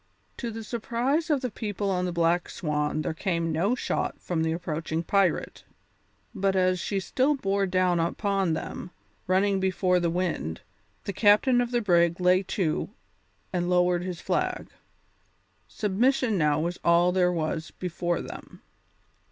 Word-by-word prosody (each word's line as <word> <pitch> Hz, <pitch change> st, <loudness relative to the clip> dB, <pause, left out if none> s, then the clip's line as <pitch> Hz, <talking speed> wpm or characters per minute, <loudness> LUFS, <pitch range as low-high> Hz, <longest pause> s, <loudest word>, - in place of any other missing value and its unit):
To 240 Hz, -, -4 dB
the 225 Hz, 0 st, -6 dB
surprise 245 Hz, +8 st, -1 dB
of 290 Hz, -4 st, +2 dB
the 250 Hz, -3 st, -3 dB
people 205 Hz, -3 st, -3 dB
on 180 Hz, -1 st, 0 dB
the 180 Hz, -, -2 dB
Black 170 Hz, +1 st, +1 dB
Swan 150 Hz, -1 st, -1 dB
there -, -, -2 dB
came 170 Hz, -1 st, -1 dB
no 185 Hz, +10 st, +1 dB
shot -, -, -2 dB
from 170 Hz, -3 st, -2 dB
the 160 Hz, 0 st, +1 dB
approaching 165 Hz, -1 st, -3 dB
pirate; 195 Hz, -1 st, 0 dB, 0.7 s
but 195 Hz, 0 st, 0 dB
as 185 Hz, -1 st, +2 dB
she 195 Hz, +3 st, -1 dB
still 265 Hz, +9 st, +1 dB
bore 195 Hz, -5 st, 0 dB
down 180 Hz, -1 st, +2 dB
upon 195 Hz, +1 st, 0 dB
them, 165 Hz, +2 st, -5 dB, 0.4 s
running 195 Hz, +2 st, +2 dB
before 185 Hz, -1 st, +2 dB
the 170 Hz, -1 st, 0 dB
wind, 170 Hz, -, -2 dB, 0.4 s
the 200 Hz, -, -4 dB
captain 215 Hz, +6 st, +4 dB
of 240 Hz, -, -1 dB
the 240 Hz, -1 st, 0 dB
brig 170 Hz, -4 st, +3 dB
lay 180 Hz, +1 st, +4 dB
to 185 Hz, -4 st, -1 dB, 0.6 s
and 175 Hz, -1 st, 0 dB
lowered 180 Hz, -1 st, +3 dB
his 180 Hz, -2 st, -5 dB
flag. -, -, -2 dB, 1.0 s
Submission 225 Hz, +3 st, +1 dB
now 150 Hz, -4 st, +2 dB
was 170 Hz, +3 st, -2 dB
all 170 Hz, +1 st, +4 dB
there 180 Hz, -1 st, +2 dB
was 160 Hz, -1 st, -2 dB
before 175 Hz, -1 st, -3 dB
them. -, -, -10 dB
180 Hz, 150 wpm, -27 LUFS, 170-205 Hz, 1.0 s, captain